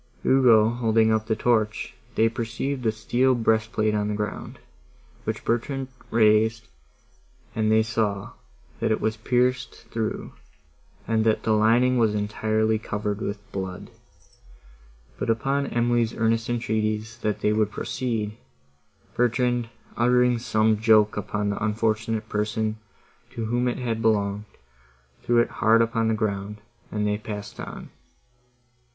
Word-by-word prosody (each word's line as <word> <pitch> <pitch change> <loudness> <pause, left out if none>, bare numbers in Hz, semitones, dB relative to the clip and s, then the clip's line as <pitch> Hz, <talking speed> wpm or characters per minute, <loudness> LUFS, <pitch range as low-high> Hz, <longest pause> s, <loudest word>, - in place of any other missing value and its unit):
Ugo 120 -5 +5
holding 115 -2 +2
up 110 0 0
the 110 - +1
torch, 110 -2 0 0.2
they 110 - +4
perceived 120 +3 -3
a - - +3
steel 125 +4 +1
breastplate 110 -1 +1
on 105 -1 0
the 105 - -2
ground, 105 0 -5 0.7
which - - -4
Bertrand 130 +3 -1 0.2
raised, 110 0 +3 0.9
and 110 -1 +1
they 110 0 +4
saw, 105 -2 -2 0.5
that 115 0 0
it 110 - +1
was 110 0 -1
pierced 125 +3 -1
through, 110 -1 -3 0.7
and 110 -1 +2
that 110 -1 +1
the 110 - +1
lining 120 +4 +3
was 110 -2 +2
entirely 110 +1 0
covered 105 -1 -3
with 100 - -3
blood; 95 -2 -6 1.3
but - - -2
upon 135 +5 0
Emily's 120 -1 +1
earnest 115 +1 0
entreaties 110 -1 -2
that 105 -2 -2
they 105 - +2
would 105 -1 +1
proceed, 110 -2 -3 0.8
Bertrand, 120 0 +1 0.3
uttering 125 0 +3
some 110 -2 +1
joke 110 -1 +4
upon 105 0 -2
the 100 - -4
unfortunate 110 0 -1
person, 110 +1 -1 0.5
to 115 - -5
whom 120 +2 0
it 120 - -1
had 115 -3 -2
belonged, 105 -2 +1 0.8
threw 120 - +1
it 120 - +3
hard 110 +1 +5
upon 115 0 +1
the 110 - +1
ground, 105 -1 -3 0.3
and 105 -1 -1
they 105 0 0
passed 105 -1 -7
on. - - -8
110 Hz, 135 wpm, -25 LUFS, 105-120 Hz, 1.3 s, Ugo